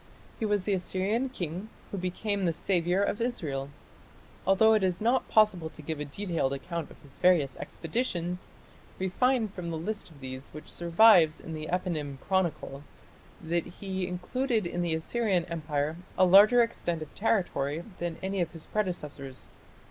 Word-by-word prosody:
He 225 - 0
was 205 -3 +1
the 205 - +1
Assyrian 195 +7 0
king 185 - -5 0.2
who 200 - -3
became 195 +2 -1
the 170 - +2
"saviour" 180 +2 +1
of 205 - -1
Israel. 145 - -2 0.8
Although 220 +3 +6
it 215 - +3
is 185 -2 +1
not 240 +4 +2
possible 200 -7 +3
to 155 - -13
give 155 0 -4
a 150 - -3
detailed 165 -3 -1
account 165 +3 -4
of - - -15
his 140 -1 -14
various 165 -8 +4
expeditions, 180 -2 -3 0.5
we 190 0 -1
find 240 0 +2
from 175 -2 -5
the 165 - -3
list 205 +6 -4
of 155 -4 -16
these 130 0 -7
which 155 - -9
survives 170 -2 +5
in 160 - -8
the 155 0 -5
Eponym 155 -7 -2
Chronicle 170 -7 -1 0.6
that 170 +1 -1
he 190 -1 -4
included 220 +5 -1
in 175 +1 -2
the 170 -2 +1
Assyrian 185 +1 0
Empire 155 -2 -2 0.2
a 185 - +6
larger 210 +6 +8
extent 170 -8 -2
of 150 - -13
territory 170 -8 0 0.2
than 170 -1 -3
any 190 0 -1
of 170 - -2
his 165 -2 -9
predecessors. 150 -10 -4
180 Hz, 165 wpm, -29 LUFS, 160-205 Hz, 0.8 s, larger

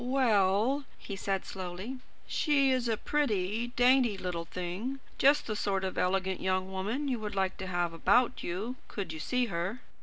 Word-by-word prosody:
"Well," 245 +1 +3
he 200 - -7
said 195 0 -2
slowly, 190 +7 -6 0.3
"she 280 -3 +2
is 255 -2 +1
a 225 -2 +1
pretty, 225 -6 0
dainty 245 -3 +4
little 180 -3 -3
thing; 185 +11 -4 0.2
just 285 +2 +5
the 215 - -2
sort 195 -2 0
of 190 - -2
elegant 190 0 0
young 185 0 0
woman 215 +10 -2
you 250 -4 0
would 210 -2 -5
like 190 -1 +1
to 190 - -5
have 175 -2 0
about 215 +9 +3
you, 210 +9 -3
could 190 -6 -5
you 160 - -7
see 250 +9 +1
her." 180 +8 -2
200 Hz, 175 wpm, -31 LUFS, 185-250 Hz, 0.3 s, just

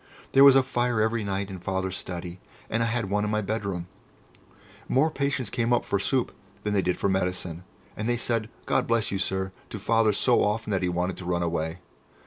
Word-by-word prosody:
There 135 - +7
was 140 -1 +9
a 135 - +6
fire 120 -3 0
every 110 +1 +1
night 100 0 -2
in 95 - -6
Father's 95 +1 -2
study, 90 0 -6 0.3
and 115 - +1
I 115 - +2
had 115 -4 -2
one 105 0 +1
in 105 - -1
my 105 0 +1
bedroom. 100 -4 -3 1.0
More 150 +5 +3
patients 140 -6 -1
came 120 -1 0
up 120 - +2
for 100 - 0
soup 125 +5 0 0.3
than 105 - -1
they 100 - +3
did 90 -1 0
for - - 0
medicine, 90 -2 -1 0.3
and 110 +3 -2
they 120 - +2
said 115 -2 -1 0.2
"God - - +1
bless 115 -2 +1
you, 100 - -1
Sir!" 95 0 -1 0.2
to - - -5
Father 115 +2 +3
so 120 +4 +3
often 105 +1 -1
that 95 - +1
he 90 - +1
wanted 90 +1 -1
to 90 - -8
run 85 -1 0
away. 85 +1 -2
105 Hz, 215 wpm, -26 LUFS, 95-115 Hz, 1.0 s, was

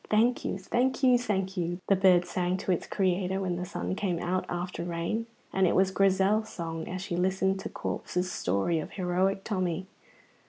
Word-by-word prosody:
"Thank 230 +3 +3
you, - - -2
thank 245 +8 0
you, 255 -1 +7
thank 195 -5 -1
you!" 175 -1 -2
the 195 - +5
bird 185 -2 +5
sang 180 +1 -1
to 190 - -2
its 175 - -1
Creator 190 0 0
when 180 -2 -1
the 180 - -3
sun - - -3
came 190 -4 -1
out 180 +2 -1
after 175 0 -3
rain, 175 +7 -2 0.3
and 190 -1 +3
it - - +2
was 190 0 +4
Grizel's 195 +3 +3
song 165 -2 -5
as 185 +1 -4
she 195 -3 -3
listened 190 +2 +1
to - - -5
Corp's 180 +1 -3
story 100 - 0
of 155 - -6
heroic 190 +1 0
Tommy. 185 -3 -1
185 Hz, 190 wpm, -29 LUFS, 175-195 Hz, 0.3 s, you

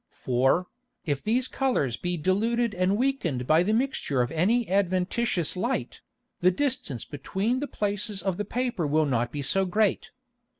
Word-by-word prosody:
For, 130 +8 +1 0.4
if 145 -3 -1
these 245 +4 +1
Colours 245 - 0
be 175 +5 -3
diluted 225 +7 +1
and 185 +2 +1
weakned 220 - 0
by 155 +4 +4
the 190 +4 +1
Mixture 220 - 0
of 120 - -4
any 210 +8 +2
adventitious 185 0 0
Light, 235 +8 -2 0.4
the 180 - +5
distance 245 - -2
between 195 - -2
the 290 - -3
Places 205 -2 -2
of 190 -2 -1
the 210 - -1
Paper 240 -10 -1
will 155 +2 +2
not 120 -4 0
be 145 -1 -4
so 195 +8 +2
great. 200 +2 +1
190 Hz, 160 wpm, -27 LUFS, 155-235 Hz, 0.4 s, the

